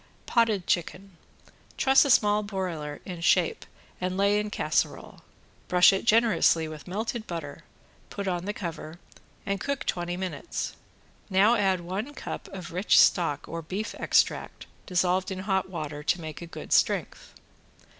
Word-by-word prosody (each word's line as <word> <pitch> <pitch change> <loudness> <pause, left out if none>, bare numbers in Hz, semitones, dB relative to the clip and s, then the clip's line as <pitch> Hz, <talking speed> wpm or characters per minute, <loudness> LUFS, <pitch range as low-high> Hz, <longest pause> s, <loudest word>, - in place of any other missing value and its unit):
~POTTED 220 -6 +2
CHICKEN~ 185 +1 -2 0.6
Truss 270 +2 +5
a - - 0
small 210 -4 +4
broiler 180 -8 -4
in 180 -3 -7
shape 175 0 +2 0.3
and 185 +1 -2
lay 200 +1 +3
in 210 0 -3
casserole. - - -2 0.5
Brush 180 +1 +6
it 195 - -2
generously 220 -8 +4
with 155 +1 -9
melted 220 +4 -4
butter, 160 -5 -7 0.4
put 200 -1 -5
on 175 -1 -2
the 205 - -1
cover, 170 -3 -6 0.5
and 200 0 -1
cook 280 -1 -3
twenty 175 0 -2
minutes. 190 - -4 0.5
Now 200 +4 +5
add 195 -5 +2
one 200 +11 -5
cup - - -6
of 185 -2 -8
rich 185 +5 +4
stock 155 -6 +3
or 165 0 -5
beef 190 +7 -4
extract - - +1 0.2
dissolved 185 +1 +1
in 190 - -4
hot 190 -1 -1
water 155 -4 -5
to 170 +4 0
make 155 -1 -7
a 170 - -7
good - - -5
strength. - - 0
185 Hz, 150 wpm, -27 LUFS, 170-205 Hz, 0.6 s, Brush